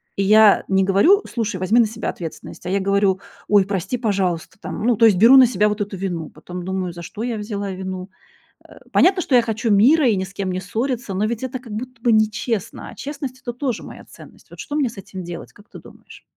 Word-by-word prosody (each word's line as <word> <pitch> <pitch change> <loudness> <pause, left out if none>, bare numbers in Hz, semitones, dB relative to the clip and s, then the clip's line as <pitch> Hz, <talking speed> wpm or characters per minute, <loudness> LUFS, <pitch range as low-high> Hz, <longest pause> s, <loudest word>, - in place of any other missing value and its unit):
И 195 - 0
я 215 +1 +6
не 195 0 +2
говорю: 260 - +4
"Слушай, 220 -5 -2
возьми 200 +6 +2
на 230 - +5
себя 225 +2 -5
ответственность". 165 0 -8
А - - -3
я 195 +1 +1
говорю: 195 -1 +1 0.3
"Ой, 205 -2 +4
прости, 200 +5 -2
пожалуйста". 190 -5 -1
Там, 210 - -6
ну, 240 -2 +3
то 230 - +5
есть 205 -5 +5
беру 235 +7 +8
на 260 - +9
себя 210 -2 +1
вот 210 0 -3
эту 200 -1 -3
вину, 175 -4 -4
потом 175 +3 -9
думаю: 190 -2 -3
за 170 0 -9
что 210 - -8
я 240 -3 -2
взяла 205 -2 -4
вину? 185 0 -6 0.5
А, - - -17
понятно, 370 0 +4
что 265 - -3
я 240 - +7
хочу 225 0 -2
мира 260 +8 +5
и 215 - +3
ни 190 - -1
с 195 +1 -9
кем 195 -2 -3
не 185 +1 -3
ссориться, 230 +2 -3
но 205 - 0
ведь 230 +1 -3
это 260 0 -3
как 235 -4 -11
будто 250 +2 -7
бы 240 - +3
нечестно, 215 -1 -1
а - - -13
честность- 275 -3 -7
это 240 - -5
тоже 250 -2 -3
моя - - -11
ценность. - - -16
Вот - - -13
что 290 - -5
мне 285 -5 +1
с 220 - -16
этим 190 -1 -8
делать, 170 -1 -8
как 205 +2 -19
ты - - -11
думаешь? - - -16
210 Hz, 240 wpm, -21 LUFS, 190-240 Hz, 0.5 s, на